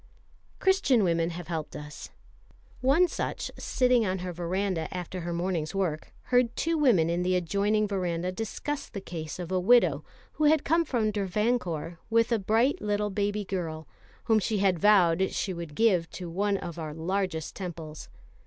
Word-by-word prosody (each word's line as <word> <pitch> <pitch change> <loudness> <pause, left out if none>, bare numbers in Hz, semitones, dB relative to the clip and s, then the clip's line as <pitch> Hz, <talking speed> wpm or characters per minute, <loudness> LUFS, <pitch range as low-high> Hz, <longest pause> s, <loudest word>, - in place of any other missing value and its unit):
Christian 380 - +3
women 170 -2 +1
have 175 0 -7
helped 160 -3 -4
us. 150 0 -8 0.7
One 280 +8 +4
such, - - -4
sitting 250 -2 +2
on 190 -2 -1
her 180 - -4
verandah 175 -1 -1
after 180 0 -5
her 170 +1 -4
morning's 170 -1 -2
work, 175 -6 -2 0.2
heard 245 -1 +3
two 330 +1 0
women 240 - +4
in 170 +1 0
the 185 +1 +1
adjoining 200 +4 +1
verandah 180 -3 -1
discuss 225 +8 -4
the 200 - -6
case 165 -5 -6
of 180 -1 -6
a 185 - +2
widow 240 +7 +4 0.3
who 310 - 0
had 305 0 +4
come 335 +1 +3
from 225 -7 0
Travancore 195 -5 -1
with 230 +1 +3
a 230 - +3
bright 225 +7 +2
little 210 0 -1
baby 205 +1 -1
girl, 165 -5 -4 0.4
whom 220 -1 +3
she 215 +1 -1
had 190 -3 +2
vowed 190 -2 +4
she 190 - -2
would 170 -4 -7
give 190 -7 +3
to 175 -2 -7
one 200 +3 +1
of 170 -3 -7
our 155 -2 -5
largest 175 -1 -2
temples. 165 -5 -7
190 Hz, 170 wpm, -28 LUFS, 170-220 Hz, 0.7 s, One